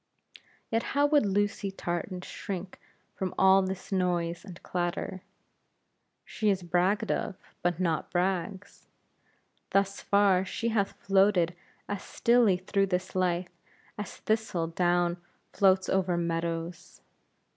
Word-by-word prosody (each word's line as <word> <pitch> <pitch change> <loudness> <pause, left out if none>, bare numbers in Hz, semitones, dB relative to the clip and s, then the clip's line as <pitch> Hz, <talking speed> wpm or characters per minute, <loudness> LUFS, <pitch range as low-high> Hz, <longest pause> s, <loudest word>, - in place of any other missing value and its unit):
Yet, 225 0 +2 0.2
how 285 - +5
would 290 -6 +3
Lucy 205 0 0
Tartan 180 0 -4
shrink 185 0 -6 0.3
from 185 -2 -4
all 190 0 +6
this 190 +1 -5
noise 175 -3 0
and 185 -4 -10
clatter! 180 +1 -3 1.0
She 215 -2 -1
is 190 -2 +1
bragged 185 +5 +1
of, 195 - -2 0.3
but 175 -1 0
not 165 -4 0
brags. 185 +2 -2 0.8
Thus 195 0 +1
far 200 -2 +3
she 230 +5 -2
hath 200 -3 0
floated 195 -3 +3 0.3
as 205 -1 -3
stilly 235 -6 +3
through 195 +2 0
this 185 0 -2
life, 180 -1 0 0.4
as 210 -3 -6
thistle 215 -6 -1
down 175 +1 +1 0.4
floats 190 -1 +4
over 185 -2 +1
meadows. 170 +1 -3
185 Hz, 120 wpm, -29 LUFS, 175-200 Hz, 1.0 s, all